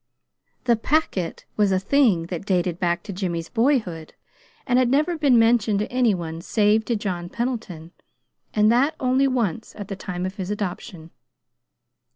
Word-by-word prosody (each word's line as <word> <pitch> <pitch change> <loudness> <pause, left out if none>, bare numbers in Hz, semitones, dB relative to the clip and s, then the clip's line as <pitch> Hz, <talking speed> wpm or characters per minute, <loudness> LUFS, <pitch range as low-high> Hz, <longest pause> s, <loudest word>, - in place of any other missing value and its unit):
"The 240 -2 +3
Packet" 225 - -1
was 205 -2 +3
a 190 - +3
thing 195 -4 +2
that 175 -1 -4
dated 180 -3 0
back 175 -1 0
to 200 - -7
Jimmy's 175 -3 -3
boyhood, 225 - 0 0.5
and 250 -1 +3
had 255 -2 +2
never 305 +6 +2
been 285 -6 +3
mentioned 225 -2 +3
to 210 - -3
any 245 -5 +2
one 165 -2 -6
save 215 +3 +2
to 235 - 0
John 180 -4 -4
Pendleton, 215 -10 -4 0.6
and 210 +1 +3
that 275 +6 +2
only 260 +1 +2
once, 230 -6 -2
at 205 -2 -8
the 195 - -4
time 180 -2 -5
of 190 +2 -5
his 190 -1 -4
adoption. 180 -5 -5
210 Hz, 165 wpm, -23 LUFS, 180-245 Hz, 0.6 s, The